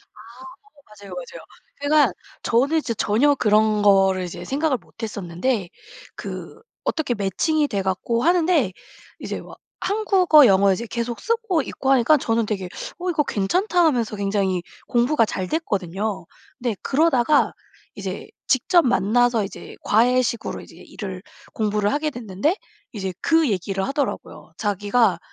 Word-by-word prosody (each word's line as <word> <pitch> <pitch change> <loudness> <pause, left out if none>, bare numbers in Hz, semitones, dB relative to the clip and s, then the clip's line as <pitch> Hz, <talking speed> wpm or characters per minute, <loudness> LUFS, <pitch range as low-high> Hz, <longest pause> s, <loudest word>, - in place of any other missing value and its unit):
아. - - -17 0.7
맞아. 205 -1 -16
맞아요, - - -7
맞아요. - - -8 0.4
제가 285 -7 +3 0.3
저는 275 +7 +2
이제 260 -7 -1
전혀 235 +8 +2
그런 215 -3 +3
거를 195 -2 +4
이제 175 - -7
생각을 285 -1 0
못 230 - -18
했었는데 200 +1 -2 0.5
그 - - -8 0.2
어떻게 310 -6 -1
매칭이 290 - 0
돼 200 -7 -2
갖고 195 +5 -1
하는데 335 - +3 0.5
이제 - - -5
막 - - -13 0.2
한국어, 380 -8 +4
영어 195 -2 +5
이제 225 +5 -2
계속 235 0 -3
쓰고 455 -7 0
있고 265 +1 -2
하니까 270 +3 +5
저는 230 -3 0
되게 195 -4 -3 0.3
'어 360 +1 -2
이거 305 -3 +1
괜찮다.' 350 - +1
하면서 240 -8 +1
굉장히 195 -2 0 0.3
공부가 240 +1 +2
잘 185 -3 -4
됐거든요. 200 - -2 0.3
근데 240 -3 -1
그러다가 290 -1 +2 0.4
이제 - - -6 0.2
직접 335 +6 +3
만나서 240 0 +2
이제 195 - -9
과외식으로 235 +1 +1
이제 - - -15
일을 190 -3 -8 0.3
공부를 210 -1 0
하게 300 +1 -1
됐는데 240 - -1 0.4
이제 190 -3 -4
그 325 -5 +3
얘기를 195 0 -2
하더라고요. 280 +1 -4
자기가 205 -1 +1
235 Hz, 315 characters per minute, -22 LUFS, 200-295 Hz, 0.7 s, 영어